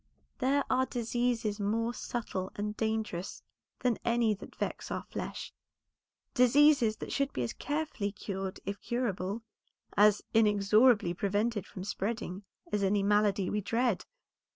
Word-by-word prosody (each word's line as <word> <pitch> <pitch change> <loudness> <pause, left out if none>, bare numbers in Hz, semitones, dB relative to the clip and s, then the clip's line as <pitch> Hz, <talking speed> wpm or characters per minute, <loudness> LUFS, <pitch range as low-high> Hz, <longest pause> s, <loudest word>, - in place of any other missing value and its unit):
There 275 +2 +2
are 260 0 +2
diseases 235 -2 -1
more 225 +3 0
subtle 200 -7 -4
and 210 +1 -3
dangerous 220 -5 -2 0.4
than 245 -3 +1
any 235 -2 +2
that 200 - -10
vex - - -3
our - - -3
flesh; - - -6 0.8
diseases 250 -2 +5
that - - -6
should 275 0 0
be 125 - -1
as 115 - -3
carefully 290 -9 -2
cured 195 -2 -5
if 200 +1 -4
curable, 220 -3 -2 0.5
as 210 0 +5
inexorably 210 -1 +4
prevented 205 +2 -1
from 185 - -8
spreading 200 -1 -3 0.3
as 210 -1 +1
any 200 +1 +2
malady 205 -1 +3
we 210 - 0
dread. 230 -1 0
215 Hz, 130 wpm, -31 LUFS, 200-240 Hz, 0.8 s, diseases